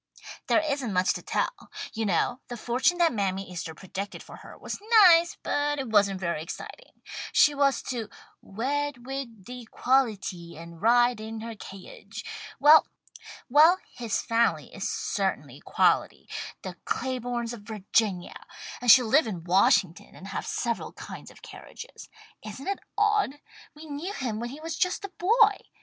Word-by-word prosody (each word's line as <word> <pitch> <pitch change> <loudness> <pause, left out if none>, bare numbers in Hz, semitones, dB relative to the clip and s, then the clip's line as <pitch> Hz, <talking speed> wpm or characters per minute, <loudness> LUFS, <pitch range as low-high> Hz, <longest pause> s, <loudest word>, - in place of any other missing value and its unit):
"There - - +4
isn't 280 -8 -2
much 185 0 +2
to - - -6
tell. - - -3 0.2
You 225 -1 -2
know 200 +7 +1
the 240 - -6
fortune 250 +10 +1
that 340 -4 +3
Mammy 195 -2 -2
Easter 165 -2 -6
predicted 195 +4 -7
for - - -12
her - - -13
was - - -6 0.3
nice, 340 -1 +5
but 290 0 0
it 265 -4 -4
wasn't 200 -3 +3
very 170 -4 -2
exciting. - - -10 0.3
She 295 - +5
was 280 -1 +2
to 235 -5 -4 0.3
'wed 265 +4 -3
wid 255 -7 -6
de 250 -1 -8
quality 205 - -1
and 170 0 -11
ride 240 +1 +4
in 220 0 -6
her 230 0 -6
ca'iage.' 210 - -10 0.3
Well, 300 +3 +7 1.1
his 235 -3 -2
family 230 0 +1
is - - -3
certainly - - -2
quality, - - +1 0.4
the - - -7
Claibornes 245 -2 -3
of 235 - -9
Virginia, 205 -3 -2 0.3
and 245 - 0
she'll 245 +3 +9
live 260 +3 +4
in 180 -6 -5
Washington 185 0 +2
and 195 - -10
have - - -4
several 235 -2 -2
kinds - - -9
of - - -18
carriages. - - -11 0.3
Isn't 215 - -8
it 395 - -1 0.2
odd? 420 -9 +2 0.4
We 305 +2 -11
knew 310 +6 -5
him 240 - -3
when 240 +1 -4
he 280 +4 -9
was 325 0 -4
just 365 +3 -1
a - - -7
boy. 425 +2 +4
240 Hz, 155 wpm, -27 LUFS, 200-290 Hz, 1.1 s, she'll